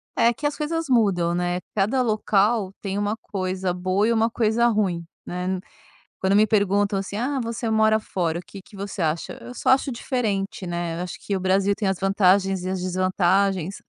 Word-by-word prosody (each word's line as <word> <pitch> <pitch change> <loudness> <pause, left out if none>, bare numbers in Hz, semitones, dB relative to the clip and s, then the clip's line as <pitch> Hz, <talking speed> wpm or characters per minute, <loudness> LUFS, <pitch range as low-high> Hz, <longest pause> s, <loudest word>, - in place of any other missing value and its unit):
É 235 +1 +4
que 285 - -7
as 290 - -3
coisas 325 +2 -2
mudam, 195 -9 +2
né, 175 0 -1 0.2
cada 215 +6 +2
local 215 -2 +1
tem 195 -1 -3
uma 205 +1 0
coisa 185 -3 -3
boa 185 +3 +1
e 235 - +3
uma 225 0 +2
coisa 230 +1 +2
ruim, 200 -7 0 0.2
né, 180 +1 -2 0.6
quando 190 +1 +2
me 215 - +6
perguntam 200 -1 +2
assim: 195 +1 -5
"Ah 265 +4 -1
você 230 0 -3
mora 220 0 +3
fora 170 -5 -2
o - - -7
que 195 - -11
que 205 - -17
você 200 -1 -5
acha?" 160 0 -1
Eu 245 - -9
só - - -1
acho 265 +1 +3
diferente, 215 -6 -2
né, 170 -1 -3
eu - - -2
acho 180 - -6
que 200 - -1
o - - -4
Brasil 195 +2 +2
tem 200 - -2
as 190 -2 0
vantagens 195 -1 +3
e 185 - -3
as 190 -1 -2
desvantagens. 185 0 +1
195 Hz, 200 wpm, -24 LUFS, 185-220 Hz, 0.6 s, me